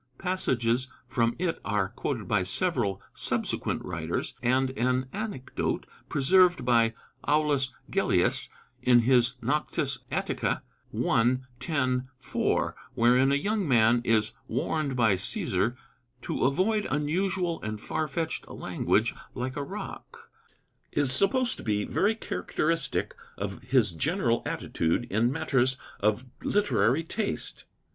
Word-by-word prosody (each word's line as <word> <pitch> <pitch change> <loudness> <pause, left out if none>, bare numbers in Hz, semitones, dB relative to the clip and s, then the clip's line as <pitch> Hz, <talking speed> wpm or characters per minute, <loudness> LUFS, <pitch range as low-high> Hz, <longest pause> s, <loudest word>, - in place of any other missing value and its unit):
Passages 130 -9 0 0.2
from 115 -2 +1
it 170 -1 -1
are 100 -2 0
quoted 115 -2 -3
by 105 -1 +2
several 105 - 0
subsequent - - -1
writers, - - -3
and 130 +2 +2
an 130 +1 0
anecdote 200 -11 -3 0.2
preserved 175 +3 +4
by 115 -2 +3 0.3
Aulus 145 -3 +2 0.2
Gellius - - +2 0.3
in 120 -1 +5
his 125 +1 +3
Noctes 150 +6 0
Atticæ - - -1 0.5
I. 120 +3 +3 0.2
10. 130 -6 0
4, 130 - 0 0.2
wherein 125 +2 +4
a - - +4
young 200 +4 0
man 120 -2 +4
is 110 -2 +2
warned 155 -4 -1
by 115 -4 +4
Cæsar 120 - 0 0.5
to - - -1
avoid 195 +10 +2
unusual 170 +3 0
and 110 0 -4
far 155 +7 -2
fetched 160 +3 -3
language - - 0 0.2
"like 130 +2 -3
a 145 - -2
rock," - - -8 0.6
is 145 -3 +1
supposed 235 - +2
to - - -8
be 105 -2 0
very 210 +3 +1
characteristic 165 -8 -1 0.2
of 100 0 -4
his 125 -5 +2
general 120 - +1
attitude 80 +9 -1
in 115 +5 +2
matters 130 -3 +1 0.2
of 110 +4 +1 0.2
literary 160 - +2
taste. 205 +6 -4
130 Hz, 120 wpm, -28 LUFS, 115-160 Hz, 0.6 s, in